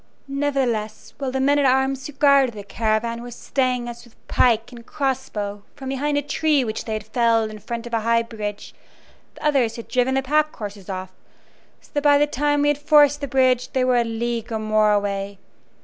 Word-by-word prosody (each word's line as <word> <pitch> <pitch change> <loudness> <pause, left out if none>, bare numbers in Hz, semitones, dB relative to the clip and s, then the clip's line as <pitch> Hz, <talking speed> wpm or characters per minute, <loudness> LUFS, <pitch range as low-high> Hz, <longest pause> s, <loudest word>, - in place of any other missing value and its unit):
Nevertheless, 270 -6 -2
while 275 -2 -2
the 265 - -2
men 285 +2 +3
at 285 - +2
arms 265 +1 +1
who 295 - -10
guarded 275 -4 +4
the 205 - -7
caravan 225 +3 -1
were 245 - -8
staying 250 0 -1
us 235 0 -8
with 235 -2 -22
pike 230 -1 +2
and 235 -1 -11
cross 265 0 -2
bow 205 -1 -4
from 265 -2 -7
behind 285 +2 -1
a 290 - 0
tree 295 -1 +1
which 220 -2 -4
they 220 - -3
had 215 -1 -4
felled 225 -1 +1
in 215 - -9
front 235 +3 -5
of 240 - -9
a 230 - +2
high 230 +1 +2
bridge 210 -3 -6 0.6
the - - -9
others 265 -7 +2
had 230 - -8
driven 255 +1 +1
the 270 - +1
pack 305 +3 +1
horses 205 -3 -8
off, 185 -1 -5 0.7
so - - -23
that 290 - 0
by 290 0 +5
the 295 - +4
time 290 0 0
we 290 - +3
had 290 -1 0
forced 290 -1 +4
the 280 - -2
bridge 255 -1 +2
they 260 - +2
were 255 -1 +3
a 240 - +3
league 230 0 -3
or 220 - -1
more 215 -1 +2
away. 200 -1 -1
245 Hz, 215 wpm, -22 LUFS, 220-275 Hz, 0.7 s, by